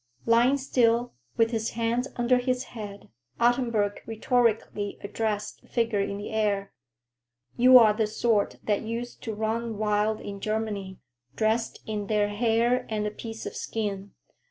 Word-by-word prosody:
Lying 240 Hz, +4 st, +4 dB
still, 245 Hz, -3 st, +2 dB, 0.2 s
with 230 Hz, 0 st, +3 dB
his 225 Hz, -1 st, -1 dB
hands 235 Hz, +3 st, 0 dB
under 245 Hz, 0 st, +3 dB
his 255 Hz, 0 st, -1 dB
head, 205 Hz, -3 st, -8 dB, 0.3 s
Ottenburg 235 Hz, -4 st, +1 dB
rhetorically 225 Hz, -2 st, 0 dB
addressed 210 Hz, 0 st, -3 dB
the -, -, -23 dB
figure 230 Hz, -3 st, 0 dB
in 200 Hz, 0 st, -2 dB
the 205 Hz, -, -6 dB
air. 205 Hz, -2 st, 0 dB, 0.8 s
"You 255 Hz, +1 st, +8 dB
are 220 Hz, -3 st, +7 dB
the 215 Hz, 0 st, 0 dB
sort 215 Hz, -1 st, +1 dB
that 205 Hz, -2 st, 0 dB
used 235 Hz, +2 st, -5 dB
to 220 Hz, -2 st, -4 dB
run 220 Hz, +1 st, -2 dB
wild 210 Hz, 0 st, +1 dB
in 200 Hz, -1 st, -7 dB
Germany, 205 Hz, -3 st, -3 dB, 0.4 s
dressed 220 Hz, +4 st, 0 dB
in 210 Hz, -2 st, -3 dB
their 210 Hz, -1 st, +1 dB
hair 230 Hz, +3 st, +1 dB
and 215 Hz, -1 st, -1 dB
a 210 Hz, -, -1 dB
piece 225 Hz, +1 st, -8 dB
of -, -, -6 dB
skin. 200 Hz, -3 st, -4 dB
220 Hz, 150 wpm, -27 LUFS, 210-235 Hz, 0.8 s, You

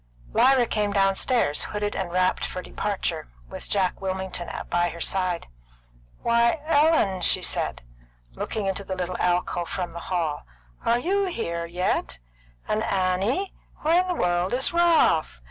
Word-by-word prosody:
Lyra 265 Hz, -2 st, +5 dB
came 210 Hz, -2 st, -1 dB
downstairs, 195 Hz, -, +2 dB
hooded 205 Hz, 0 st, -3 dB
and 185 Hz, -3 st, -3 dB
wrapped 185 Hz, +1 st, +1 dB
for -, -, -3 dB
departure, -, -, -3 dB, 0.2 s
with -, -, -9 dB
Jack 190 Hz, -2 st, 0 dB
Wilmington 190 Hz, -2 st, -3 dB, 0.2 s
by 175 Hz, 0 st, +2 dB
her 170 Hz, -, -9 dB
side. 185 Hz, 0 st, 0 dB, 0.8 s
"Why, 235 Hz, +5 st, +3 dB
Ellen!" 300 Hz, -, +3 dB
she -, -, +3 dB
said, -, -, -1 dB, 0.5 s
looking 210 Hz, -, -3 dB
into 195 Hz, +1 st, -2 dB
the 190 Hz, -1 st, -4 dB
little 180 Hz, 0 st, -3 dB
alcove 175 Hz, -1 st, 0 dB
from 180 Hz, -3 st, -3 dB
the 170 Hz, -, -6 dB
hall. 165 Hz, -5 st, -1 dB, 0.4 s
"Are 235 Hz, -, +3 dB
you 390 Hz, +9 st, +1 dB
here 170 Hz, -, -3 dB
yet? 175 Hz, -, -1 dB, 0.5 s
And 215 Hz, -, 0 dB
Annie! 200 Hz, -, 0 dB, 0.3 s
Where 330 Hz, +3 st, +4 dB
in 370 Hz, -, -4 dB
the 360 Hz, -, -1 dB
world 175 Hz, -, +1 dB
is 265 Hz, +6 st, +1 dB
Ralph?" 330 Hz, -, +3 dB
190 Hz, 145 wpm, -25 LUFS, 175-240 Hz, 0.8 s, Lyra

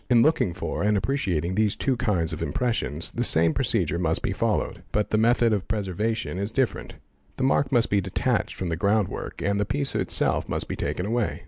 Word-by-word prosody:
In 120 Hz, -2 st, +6 dB
looking 125 Hz, -, +2 dB
for 95 Hz, -, -3 dB
and 105 Hz, 0 st, +2 dB
appreciating 95 Hz, -, -1 dB
these 105 Hz, +1 st, +1 dB
two 135 Hz, -, 0 dB
kinds 90 Hz, -8 st, 0 dB
of 80 Hz, -, -5 dB
impressions 115 Hz, -, -2 dB
the 120 Hz, -, -2 dB
"same 80 Hz, -7 st, +4 dB
procedure 85 Hz, -, 0 dB
must 80 Hz, -2 st, 0 dB
be -, -, 0 dB
followed; -, -, -1 dB
but 105 Hz, 0 st, -1 dB
the 110 Hz, -, +3 dB
method 115 Hz, 0 st, +3 dB
of 100 Hz, -3 st, -2 dB
preservation 105 Hz, 0 st, -2 dB
is 100 Hz, +2 st, -2 dB
different: 130 Hz, +1 st, -1 dB, 0.4 s
the -, -, -1 dB
mark 135 Hz, 0 st, +2 dB
must 120 Hz, -3 st, +2 dB
be 100 Hz, -1 st, +3 dB
detached 95 Hz, 0 st, -1 dB
from 95 Hz, -, -3 dB
the 80 Hz, -, -1 dB
ground 100 Hz, +2 st, +2 dB
work -, -, -6 dB
and 100 Hz, 0 st, +1 dB
the -, -, +2 dB
piece 140 Hz, +6 st, -2 dB
itself -, -, 0 dB
must -, -, -2 dB
be -, -, -3 dB
taken 90 Hz, -, -2 dB
away. 115 Hz, -1 st, -1 dB
105 Hz, 210 wpm, -25 LUFS, 90-120 Hz, 0.4 s, In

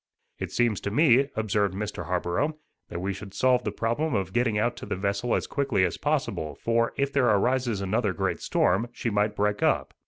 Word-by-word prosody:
"It -, -, -4 dB
seems 120 Hz, -5 st, +1 dB
to -, -, -2 dB
me," 135 Hz, +2 st, +4 dB
observed 105 Hz, -3 st, 0 dB
Mr. 100 Hz, -4 st, -4 dB
Harborough, 90 Hz, -, -1 dB, 0.3 s
"that 85 Hz, -, -5 dB
we 100 Hz, +1 st, -1 dB
should 100 Hz, 0 st, -10 dB
solve 125 Hz, +3 st, +3 dB
the -, -, -2 dB
problem 120 Hz, +5 st, -1 dB
of 95 Hz, -2 st, -2 dB
getting 120 Hz, -3 st, +1 dB
out 120 Hz, +3 st, +1 dB
to -, -, -8 dB
the -, -, -2 dB
vessel 100 Hz, +5 st, -1 dB
as -, -, -1 dB
quickly 135 Hz, -10 st, +1 dB
as 90 Hz, -, -2 dB
possible; 75 Hz, -2 st, -1 dB
for, 115 Hz, 0 st, +1 dB
if 140 Hz, 0 st, 0 dB
there 135 Hz, -3 st, +3 dB
arises 120 Hz, 0 st, +1 dB
another 105 Hz, +2 st, 0 dB
great 90 Hz, -, -2 dB
storm, 115 Hz, -, +1 dB
she 120 Hz, -2 st, -3 dB
might 105 Hz, +1 st, +1 dB
break 105 Hz, 0 st, 0 dB
up." -, -, +1 dB
110 Hz, 200 wpm, -26 LUFS, 100-125 Hz, 0.3 s, me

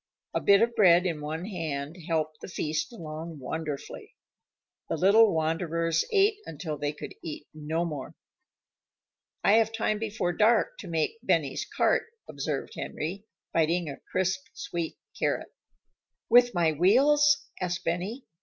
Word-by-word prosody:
A -, -, 0 dB
bit 200 Hz, +2 st, +6 dB
of 235 Hz, 0 st, +1 dB
bread 180 Hz, -4 st, +5 dB
in 165 Hz, -4 st, -1 dB
one 160 Hz, +4 st, -4 dB
hand 160 Hz, -6 st, -4 dB
helped 155 Hz, -2 st, -1 dB
the -, -, -7 dB
feast 155 Hz, +4 st, -2 dB
along 160 Hz, -5 st, -7 dB
wonderfully. 150 Hz, +1 st, -6 dB, 0.7 s
The -, -, -1 dB
little 210 Hz, +3 st, +6 dB
wanderers 165 Hz, +1 st, 0 dB
ate 415 Hz, 0 st, +3 dB
until 155 Hz, 0 st, -5 dB
they 145 Hz, 0 st, -2 dB
could 150 Hz, -, -8 dB
eat 150 Hz, -2 st, -6 dB
no 155 Hz, +2 st, -2 dB
more. 150 Hz, -5 st, -6 dB, 1.3 s
"I -, -, +5 dB
have 225 Hz, -1 st, +3 dB
time 215 Hz, -1 st, 0 dB
before 215 Hz, -5 st, -1 dB
dark 220 Hz, +3 st, +3 dB
to 195 Hz, -, -8 dB
make 165 Hz, +6 st, -1 dB
Benny's 155 Hz, -, 0 dB
cart," -, -, +3 dB, 0.2 s
observed 140 Hz, -1 st, -4 dB
Henry, 190 Hz, +7 st, -5 dB, 0.3 s
biting 165 Hz, 0 st, +1 dB
a -, -, -9 dB
crisp, 190 Hz, 0 st, 0 dB
sweet 170 Hz, -2 st, -4 dB, 0.2 s
carrot. -, -, -1 dB, 0.8 s
"With 245 Hz, -1 st, +6 dB
my 170 Hz, -2 st, +3 dB
wheels?" 280 Hz, -, +4 dB, 0.2 s
asked 180 Hz, -1 st, -2 dB
Benny. 190 Hz, +10 st, -2 dB
170 Hz, 140 wpm, -28 LUFS, 155-210 Hz, 1.3 s, bit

